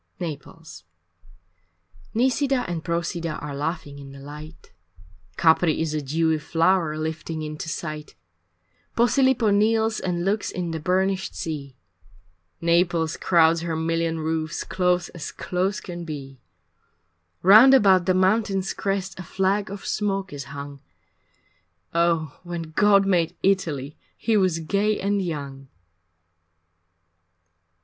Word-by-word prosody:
III 175 -3 -2
Naples 150 - -11 1.3
Nisida 260 +2 +1
and 170 -2 -4
Prosida 170 -1 -2
are 145 -1 -6
laughing 145 -1 -4
in 135 -1 -11
the 140 - -11
light, 150 +3 -11 0.7
Capri 160 -1 +3
is 160 -1 -1
a 155 - -1
dewy 160 +3 0
flower 165 0 +1
lifting 160 0 -4
into 155 +1 -5
sight, 155 -2 -6 0.8
Posilipo 240 -1 +3
kneels 220 +1 +2
and 175 -1 -2
looks 205 +2 0
in 175 -2 -4
the 160 - -3
burnished 190 +3 0
sea, 140 -5 -5 0.9
Naples 170 -1 +2
crowds 165 -2 +3
her 165 -1 -2
million 165 0 -1
roofs 160 0 -2
close 180 -2 0
as 170 -3 -7
close 190 +3 -2
can 175 -1 -7
be; 140 -5 -8 1.0
Round 220 +9 +9
about 190 -7 +4
the 185 - +3
mountain's 195 0 +1
crest 195 -1 -3
a - - -5
flag 195 +4 0
of 200 0 -8
smoke 195 -3 -2
is 140 -2 -6
hung 140 0 -8 1.1
Oh 170 -3 +1
when 175 -1 -5
God 200 +3 +4
made 175 -4 +1
Italy 155 -8 0 0.2
he 225 - 0
was 185 -5 +2
gay 205 +6 0
and 200 0 0
young! 140 -6 -5
170 Hz, 125 wpm, -24 LUFS, 155-195 Hz, 1.3 s, Round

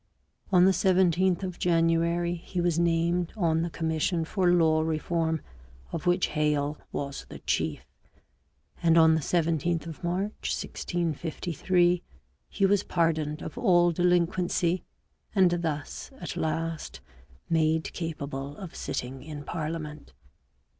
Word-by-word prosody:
On 180 -1 +6
the 190 - +6
17th 185 -1 +3
of 185 -2 -5
January 170 0 +2
he 175 +1 -5
was 170 -1 +1
named 170 +1 +1
on 165 -4 +2
the 170 - -1
commission 160 +1 -1
for 185 +1 +1
law 160 -2 +4
reform, 160 0 -1 0.5
of 165 +2 -4
which 175 +1 +3
Hale 150 -1 0
was 140 -1 -5
the - - -8
chief; - - -2 1.0
and 165 -1 +4
on 160 -1 +7
the 160 - +1
17th 165 +1 0
of 165 0 -9
March 190 +5 -2
1653, 175 +1 0 0.5
he 195 - +1
was 200 0 +3
pardoned 160 -3 0
of - - -6
all 175 -5 +4
delinquency 175 0 +1 0.5
and 185 -3 +5
thus 155 -3 -4
at - - -5
last 160 0 -3 0.5
made 160 -1 +1
capable 145 -4 -5
of 185 -4 -8
sitting 130 +2 -4
in 150 -2 -7
parliament. 155 - -5
165 Hz, 125 wpm, -28 LUFS, 160-175 Hz, 1.0 s, on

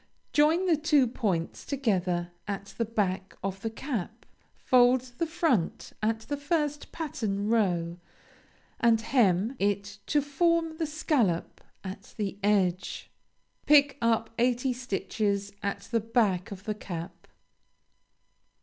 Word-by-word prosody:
Join 315 +5 +4
the 340 -4 +3
two 300 -3 +4
points 200 -9 -2
together 185 -10 0 0.2
at 200 -1 -5
the 230 - +2
back 195 -4 -2
of 195 0 -3
the 225 - -2
cap. 225 -3 -5 0.3
Fold 250 0 +4 0.2
the 335 - +1
front 315 - 0
at 220 +1 0
the 285 +6 -4
first 295 0 -1
pattern 215 -10 -2
row, 175 -6 +1 0.8
and 230 -1 +4
hem 225 -1 +2
it 200 0 -1
to 295 - +3
form 325 +3 +1
the 320 -2 -1
scallop 265 - 0 0.2
at 195 +1 -8
the 200 -2 -3
edge. 190 -3 0 0.6
Pick 285 -1 +5
up 225 -1 +1
eighty 250 +1 +2
stitches 205 -4 -2
at 200 0 -2
the 230 - +3
back 210 -5 +1
of 200 -1 -8
the 215 - -2
cap. 175 -3 -7
225 Hz, 125 wpm, -28 LUFS, 195-280 Hz, 0.8 s, Pick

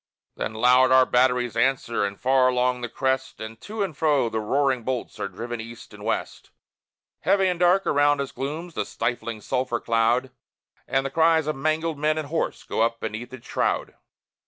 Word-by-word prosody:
Then 110 - -4
loud 125 +3 +5
our 130 0 +7
batteries 125 -2 +2
answer, 120 -2 +1
and 100 0 -5
far 130 +1 +3
along 125 0 +1
the 120 - -4
crest, 130 +1 -1
And 110 0 -8
to 215 0 -3
and 175 -6 -4
fro 150 -5 +2
the 110 - -2
roaring 130 +3 +1
bolts 125 +1 -4
are - - -2
driven 115 +4 -6
east 115 +1 -11
and - - -11
west; - - -3 0.7
Heavy 195 -1 +2
and 180 -2 -1
dark 180 +2 +4
around 145 0 +3
us 140 -1 -3
glooms 155 +6 -5
the - - -1
stifling 115 -2 -3
sulphur 125 0 -1
cloud, 115 +3 +1 0.6
And 135 0 0
the 135 - -3
cries 160 +1 +3
of 155 - -1
mangled 155 +2 -1
men 155 +1 +1
and 155 -2 -4
horse 165 +1 -2
go - - -2
up 115 0 +1
beneath 110 +3 -5
its 130 -2 -11
shroud. - - -1
130 Hz, 185 wpm, -24 LUFS, 120-150 Hz, 0.7 s, our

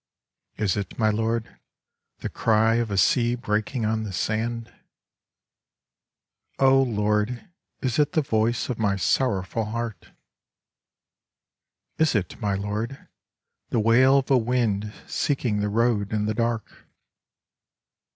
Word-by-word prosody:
Is 105 -4 +1
it, 100 -3 -5
my 110 -2 +3
Lord, 115 +1 -2 0.6
the - - -3
cry 110 +1 +2
of 120 -2 -1
a 100 - -2
sea 120 +6 +3
breaking 110 +1 -2
on 110 0 0
the 105 -2 -5
sand? 115 +4 -2 1.8
Oh 135 0 +5
Lord, 105 - 0 0.3
is 130 +1 -1
it 150 +3 +2
the 155 -3 +2
voice 115 -1 0
of 125 -3 -4
my 100 -2 +1
sorrowful 105 0 0
heart? 115 0 -5 1.9
Is 160 -5 +3
it, 100 +3 -2
my 100 -2 0
Lord, 105 +6 -4 0.6
the 115 - +1
wail 125 +5 +5
of 135 0 -1
a 130 - +6
wind 110 -4 0
seeking 125 -7 -1
the 105 0 0
road 110 -2 +1
in 105 -1 0
the 110 - 0
dark? 115 -1 -3
115 Hz, 125 wpm, -25 LUFS, 105-120 Hz, 1.9 s, a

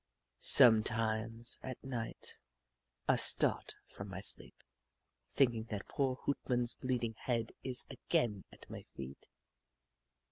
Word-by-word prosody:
Sometimes, 115 -1 +4
at 130 -2 -9
night, 120 -4 -7 0.7
I - - +2
start - - +3
from 100 +1 -11
my 95 0 -8
sleep, 100 - +2 0.7
thinking 120 -5 0
that 105 -3 -7
poor 135 -2 -2
Hoot 140 - -3
Mon's 120 -1 0
bleeding 120 -3 -4
head 115 -1 -4
is 130 -1 -4
again 115 -5 -3
at - - -17
my - - -10
feet. 70 0 -11
115 Hz, 115 wpm, -32 LUFS, 110-125 Hz, 0.7 s, Sometimes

